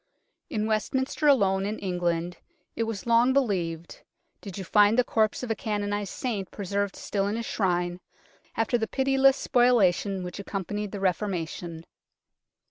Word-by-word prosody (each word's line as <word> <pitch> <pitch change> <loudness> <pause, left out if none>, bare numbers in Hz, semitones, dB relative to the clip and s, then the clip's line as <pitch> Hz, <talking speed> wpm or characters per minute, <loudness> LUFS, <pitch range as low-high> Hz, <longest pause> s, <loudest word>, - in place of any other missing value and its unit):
In 215 -8 -1
Westminster 260 +7 0
alone 195 -9 +4
in 215 +1 -3
England, 175 -2 -2 0.4
it 230 - 0
was 225 -3 -5
long 235 +2 +4
believed, 175 -11 -1 0.4
did 195 -3 -8
you 195 - -4
find 210 +4 +4
the 250 - +5
corpse 220 0 0
of 240 - -2
a - - +1
canonized 205 -1 -2
saint 210 -7 -3
preserved 200 0 -2
still 200 -1 -2
in 205 - -1
his 230 0 -3
shrine, 175 -4 -1 0.6
after 230 +2 +1
the 220 - -1
pitiless 270 +1 +3
spoilation 200 -6 +2
which 180 +2 -7
accompanied 200 +1 -4
the 205 - -5
Reformation. 175 -3 -2
205 Hz, 145 wpm, -27 LUFS, 185-230 Hz, 0.6 s, the